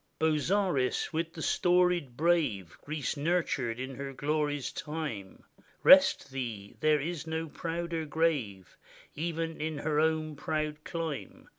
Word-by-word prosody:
Bozzaris! 160 -2 +1
with 165 +1 -1
the 160 - -6
storied 175 -7 +2
brave 150 - +1
Greece 150 -2 -3
nurtured 140 -7 0
in 130 +1 -4
her 140 -1 -5
glory's 145 +1 -1
time, 150 -12 -5 0.4
Rest 135 - +7
thee 115 -7 -5
— - - -31
there 155 -1 +4
is 165 +2 -4
no 160 0 -2
prouder 165 +1 -3
grave, 140 - -1 0.4
Even 165 0 -3
in 155 -1 -2
her 150 0 0
own 155 -1 +1
proud 155 0 -3
clime. 165 -4 -5
155 Hz, 130 wpm, -30 LUFS, 135-165 Hz, 0.4 s, Rest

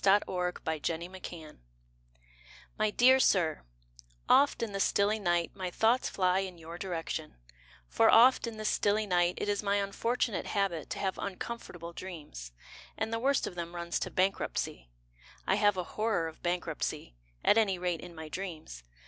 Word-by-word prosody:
TO 195 - +5
AN 205 +1 +6
HOTEL 170 -1 -2
KEEPER 160 -4 -9 1.2
My 215 0 +1
dear 255 +5 +5
Sir, 170 - +2 0.7
Oft 280 -3 +4
in 225 - -3
the 195 - -3
stilly 205 +2 +2
night 175 -3 +1
My 185 -2 -4
thoughts 225 +7 +2
fly 185 -1 +2
In 190 -2 -4
your 165 +1 -9
direction, 165 -4 -4 0.5
For - - +4
oft 250 +1 +6
in 225 -1 -6
the 215 - -5
stilly 210 +1 +2
night 175 -2 +2
It - - -3
is 205 -1 0
my 200 -1 +1
unfortunate 205 +3 -1
habit 195 -6 -1
To - - -4
have 190 -2 -2
uncomfortable 180 -4 -6
dreams, 150 - -8 0.5
And 220 +1 -2
the 230 - 0
worst 275 +3 +2
of - - -5
them 170 0 -6
Runs 170 0 -2
to - - -3
bankruptcy. 185 - -1 0.6
I - - +2
have 205 -2 +3
a 180 - -1
horror 210 -3 -1
of 160 - -10
bankruptcy, 175 - -3 0.3
At 225 - +6
any 195 -4 +2
rate 175 -2 -2
in 175 -1 -10
my 160 -1 -7
dreams. 160 - -6
185 Hz, 165 wpm, -31 LUFS, 170-210 Hz, 1.2 s, AN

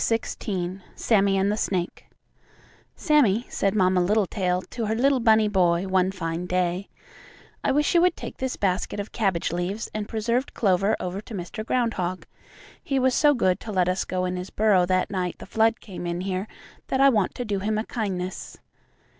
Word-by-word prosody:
XVI 190 -5 -2
SAMMIE 200 -3 +2
AND 195 +1 +2
THE 210 - -1
SNAKE 180 -5 -2 0.9
"Sammie," 250 - +3
said 195 +1 0
Mamma 185 -2 +3
Littletail 185 -2 +1
to 230 -3 -5
her 220 - 0
little 270 +3 +3
bunny 220 -2 +4
boy 180 -3 +2
one 185 0 +2
fine 170 -1 -4
day, 180 +1 -1 0.7
"I - - +2
wish 295 +4 +2
you 340 - +5
would 360 -1 +3
take - - -7
this 260 -1 -3
basket 195 +1 -1
of 205 - -5
cabbage 195 -8 0
leaves 185 +6 -3
and 215 -1 -4
preserved 235 +4 -1
clover 195 0 +2
over 185 +2 -4
to 220 0 -9
Mr. 185 +4 -5
Groundhog. 210 -7 -1 0.6
He 275 - -1
was 260 -1 +3
so 295 +1 +4
good 185 -6 +1
to 220 - -7
let 185 -3 +2
us 185 +1 0
go 185 0 -2
in 180 0 -2
his 180 +1 -6
burrow 200 -4 +3
that 185 +1 +1
night 180 -3 -2
the - - -10
flood 225 +3 +2
came 185 -4 -7
in 170 +1 -2
here 190 +1 -3 0.4
that 265 - -1
I 275 0 +7
want 210 -7 +1
to 245 - -4
do 205 -3 -1
him 215 +2 -1
a 215 - -2
kindness." 190 -5 -4
195 Hz, 190 wpm, -25 LUFS, 185-225 Hz, 0.9 s, I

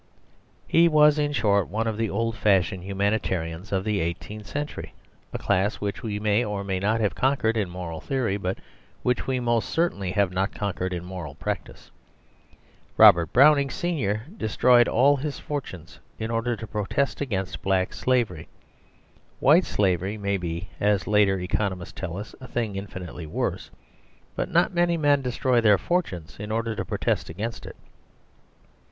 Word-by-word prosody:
He 170 +1 +5
was, 150 -1 +5
in 145 0 +1
short, 105 -7 +2
one 110 +3 -2
of 110 -1 -1
the 110 0 -1
old 115 +2 -1
fashioned 95 -4 +2
humanitarians 95 -3 -2
of 95 -1 0
the 105 -1 0
eighteenth 100 +5 -5
century, 145 +1 -5 0.4
a - - -3
class 95 +3 +1
which 100 -1 -4
we 105 -3 -3
may 105 +2 +2
or 105 -3 -3
may 95 -1 -2
not 105 +4 +1
have 105 - +1
conquered 130 -4 +1
in 105 -5 -1
moral 85 -3 -6
theory, 130 -7 -1
but 95 -2 -3 0.5
which 125 0 0
we 130 -1 0
most 120 -2 0
certainly 160 - 0
have 100 -2 +2
not 95 +2 -1
conquered 95 -2 -2
in 90 -1 -4
moral 90 -6 -7
practice. - - -6 1.1
Robert 85 -2 +7
Browning 140 +1 +5
senior 120 - -2
destroyed 120 - +4
all 140 +4 +4
his 145 +1 -4
fortunes 95 - -7 0.2
in 110 +1 -4
order 115 +1 0
to 110 - -7
protest 110 +7 -2
against 95 -9 -3
black 95 -1 0
slavery; 120 -11 0 0.9
white 160 +7 +5
slavery 95 +1 0
may 100 -1 -1
be, 85 0 -4
as 105 -1 +2
later 105 -2 +3
economists 90 0 -2
tell 90 -2 -5
us, 105 +2 -7
a 130 - -8
thing 115 -4 -2
infinitely 90 -4 -7
worse, - - -3 0.7
but - - -2
not - - +2
many 175 -1 +2
men 145 -2 +3
destroy 125 -1 +1
their 105 -3 +5
fortunes 95 - -2
in 105 +1 -5
order 115 0 -1
to - - -2
protest - - -1
against 105 +8 -5
it. - - -9
105 Hz, 160 wpm, -25 LUFS, 95-125 Hz, 1.1 s, Robert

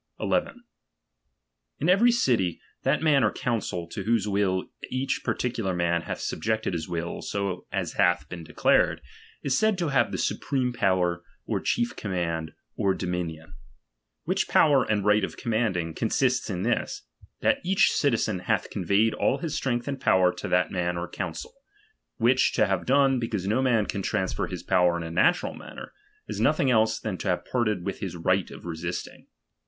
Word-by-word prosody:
1 - - -4
1. 245 -3 -1 1.1
In 155 - -1
every 205 +7 +5
city, 115 - +1 0.2
that - - +1
man 145 -5 +4
or 105 - +3
council, 105 -8 -2
to 100 - -5
whose 110 0 +1
will 100 -2 +1 0.2
each 130 +2 -1
particular 115 -7 -1
man 85 -1 +1
hath - - -5
subjected 110 -3 -2
his 80 -1 -4
will 85 0 -3
so 100 -3 -3
as - - -2
hath 85 -4 +2
been 85 0 -8
declared, 80 - +2 0.4
is 135 -2 +1
said 215 +4 +2
to 170 -4 -1
have 140 - +2
the - - -2
supreme 130 -3 -1
power, 90 -6 +1 0.2
or - - -1
chief 120 - 0
command, 85 -5 -3 0.2
or 95 -1 +1
domi 90 -1 -2
nion: 80 -1 -9 0.7
Which - - 0
power 140 -4 +5
and 105 -2 0
right 105 0 +4
of - - -4
commanding, 105 -8 -1
consists 125 +5 0
in 90 -2 -2
this, 115 +1 -1 0.4
that - - +2
each 195 +3 +3
citizen 110 -8 +1
hath - - -1
conveyed 100 +5 +2
all 135 - +1
his 155 +1 -4
strength 120 -1 -1
and 135 -2 -4
power 90 -1 +4
to - - -6
that 90 0 +2
man 90 -2 -1
or 85 +1 -3
council; 90 -4 -6 0.6
which 125 +3 +3
to 110 - +3
have 95 -3 -1
done, 135 -1 +4
because 110 -5 -3
no 110 +6 +1
man 120 -5 +2
can 100 - -3
transfer 95 -1 -1
his - - -6
power 90 -1 +3
in 85 - -4
a 80 - -6
natural 95 - +2
manner, - - -10 0.3
is - - -4
nothing 135 - +3
else 110 -1 +3
than 105 -5 -4
to - - -4
have 90 - 0
parted 105 -7 -1
with 100 - -3
his 95 -4 -4
right 90 +2 +1
of - - -11
resisting. 85 +1 -5
100 Hz, 180 wpm, -26 LUFS, 90-125 Hz, 1.1 s, every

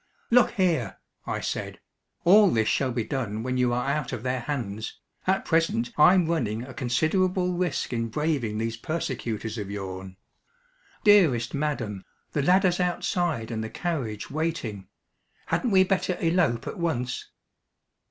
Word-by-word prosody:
"Look 245 0 +5
here," 165 - 0 0.3
I - - -2
said, - - -4 0.4
"all 200 +3 +7
this 110 -7 +1
shall 130 -2 +1
be 120 -1 -1
done 110 -4 -3
when 130 +1 -1
you 125 -1 +3
are 125 +2 -1
out 140 -2 -1
of 120 -3 -5
their 130 0 -1
hands. 115 -6 -4 0.3
At 190 +1 +1
present 205 +9 +1
I'm 180 +3 +6
running 120 -9 -1
a 130 0 -9
considerable 180 +9 +1
risk 175 -8 -1
in 115 -1 -1
braving 135 -4 -1
these 115 +1 -2
persecutors 120 -7 -3
of 100 -2 -5
yourn. 95 -2 -6 0.9
Dearest 155 - +5
madam, 140 -10 -2 0.3
the 145 - 0
ladder's 180 +3 +3
outside 175 - -1
and 110 -1 -2
the 110 - -5
carriage 130 - -3
waiting. 145 - -3 0.6
Hadn't 250 - 0
we 190 -2 +6
better 185 -1 0
elope 165 -8 +1
at - - -6
once?" 125 -8 -2
135 Hz, 145 wpm, -26 LUFS, 115-175 Hz, 0.9 s, all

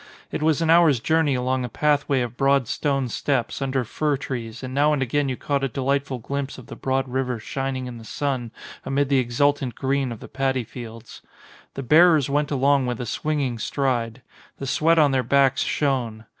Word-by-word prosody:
It - - -3
was 160 +1 +2
an 160 - +3
hour's 165 -6 +5
journey 155 +1 +2
along 130 +1 0
a 125 - -4
pathway 145 -1 +1
of 120 -1 -4
broad 135 -1 +2
stone 135 -1 -1
steps, 125 +1 -2
under 130 -1 0
fir 145 +5 -1
trees, 120 -3 -6
and 130 0 -5
now 145 +2 +3
and 145 - -1
again 140 +3 0
you 130 - -3
caught 140 -1 -1
a - - +2
delightful 135 +1 -1
glimpse 140 +3 -4
of 130 - -11
the - - -9
broad 135 0 -1
river 125 -1 -2
shining 130 +3 -4
in 120 -2 -7
the - - -12
sun 130 0 -3 0.3
amid 140 0 0
the 135 -2 +4
exultant 130 +1 0
green 135 -1 -1
of 115 - -7
the - - -10
padi 130 -2 -1
fields. 115 -1 -10 0.5
The 135 - -4
bearers 155 0 +5
went 145 +1 +1
along 140 -1 +2
with 125 -2 -3
a 125 - -3
swinging 140 -3 -2
stride. 120 -3 -2 0.3
The 135 - -6
sweat 165 +5 +2
on 150 -3 +5
their 130 -1 +2
backs 135 +1 +3
shone. 120 -6 -1
135 Hz, 200 wpm, -23 LUFS, 125-145 Hz, 0.5 s, hour's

